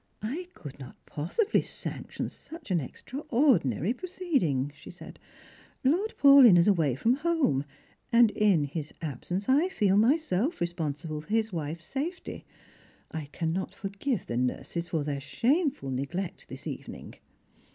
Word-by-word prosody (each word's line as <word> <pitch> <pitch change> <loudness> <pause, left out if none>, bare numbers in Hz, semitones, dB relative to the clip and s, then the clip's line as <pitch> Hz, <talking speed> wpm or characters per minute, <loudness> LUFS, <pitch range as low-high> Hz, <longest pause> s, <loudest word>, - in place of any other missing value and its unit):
" - - -43
I 305 +12 -3
could 145 -4 -10
not 130 - -10
iDossibly 185 - 0
sanction - - -5
such 320 - -10
an 175 - +3
extraordinary 230 - +1
proceed 355 -2 -1
ing," 140 -3 0
she - - -13
said. - - -11 0.3
*' - - -26
Lord 355 +11 +1
Paulyn 275 -9 +8
is 170 - +5
away 160 - +3
from 235 - +2
home, 295 - +1 0.5
and 235 -2 +6
in 200 -9 +3
his 150 +1 -5
absence 175 +7 -3
I 295 +8 +4
feel 200 - +2
myself 265 - +2
responsible 155 -3 -3
for 155 - -20
his 220 -1 +1
wife's 160 0 -4
safety. 305 - -5 0.7
I 160 -2 -4
cannot 165 +5 -3
forgive 200 +4 -3
the 120 - -3
nurses 135 +7 -2
for 160 -4 -1
their 140 -1 -3
shameful 265 - 0
neglect 165 +8 -4
this - - -9
evening." - - -7
190 Hz, 145 wpm, -28 LUFS, -, 0.7 s, Paulyn